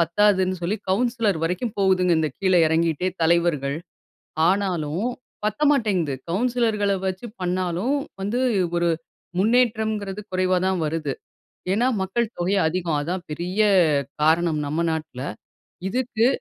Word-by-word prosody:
பத்தாதுன்னு 185 +2 +3
சொல்லி 195 +6 0
கவுன்சிலர் 230 -3 +1
வரைக்கும் 185 +7 -2
போகுதுங்க 185 -3 +3
இந்த 155 - 0
கீழே 185 -2 +3
இறங்கிட்டே 165 +2 +1
தலைவர்கள். 160 -4 +2 0.7
ஆனாலும் 185 -1 0 0.4
பத்த 215 +6 -1
மாட்டேங்குது. 195 - +1 0.2
கவுன்சிலர்கள 220 -1 +1
வச்சு 185 +5 -3
பண்ணாலும் 180 +6 0 0.3
வந்து 205 +5 -1 0.4
ஒரு 170 0 +2 0.5
முன்னேற்றம்ங்கிறது 220 -2 +1
குறைவா 185 0 +2
தான் 190 -2 0
வருது. 155 -2 -2 0.6
ஏன்னா 230 +6 +2 0.2
மக்கள் 230 +5 0
தொகை 185 +3 +1
அதிகம் 170 -2 -1
அதான் 175 +5 -3
பெரிய 175 +6 -3 0.6
காரணம் 160 0 +3
நம்ம 155 +4 -1
நாட்ல. 155 -5 -4 0.7
இதுக்கு 245 +1 +1
185 Hz, 115 wpm, -23 LUFS, 170-210 Hz, 0.7 s, பத்தாதுன்னு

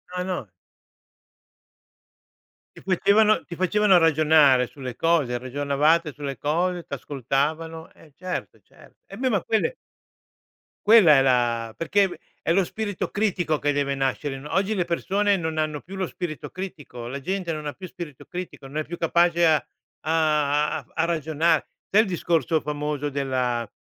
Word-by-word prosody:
No, 180 - -1
no. 180 - -4 2.3
Ti - - -11
facevano 205 +3 +3
ti 170 - -8
facevano 190 +2 +4
ragionare 155 -5 +5
sulle 130 -3 -8
cose, 145 -8 +1
ragionavate 145 +5 +1
sulle 140 -1 -5
cose, 175 +4 -1
t'ascoltavano, 155 +5 -3
eh, 155 -3 -20
certo, 185 0 -5
certo - - -20
e 195 - -10
beh 260 +2 0
ma 205 -6 +1
quelle 220 - 0 1.1
Quella 205 -9 +7
è 135 - +5
la 120 -3 +1
perché 195 +2 +1 0.2
è 165 - +1
lo 195 +2 +3
spirito 205 +1 -4
critico 180 -7 0
che 145 0 +1
deve 140 -1 0
nascere 135 +1 -2
no, 150 +2 -8
oggi 200 +3 +1
le 180 -3 0
persone 200 +4 +1
non 160 -2 -3
hanno 155 -2 -1
più 195 +3 -10
lo 185 - -1
spirito 170 -4 -6
critico, 145 -10 -8
la 135 +3 -5
gente 185 +3 -3
non 155 -1 -5
ha 145 - -3
più 185 -1 -9
spirito 160 -8 -9
critico, 180 -6 -7
non 140 +3 -7
è 155 - -1
più 175 +2 -7
capace 170 +1 +3
a 160 - +5 0.5
a 150 -2 +1
a - - -9
a 165 - +1
ragionare. 160 0 +1 0.2
Sai 210 - +5
il 220 - -1
discorso 165 -3 0
famoso 150 -1 -3
della 130 -4 -1
160 Hz, 155 wpm, -24 LUFS, 145-180 Hz, 2.3 s, Quella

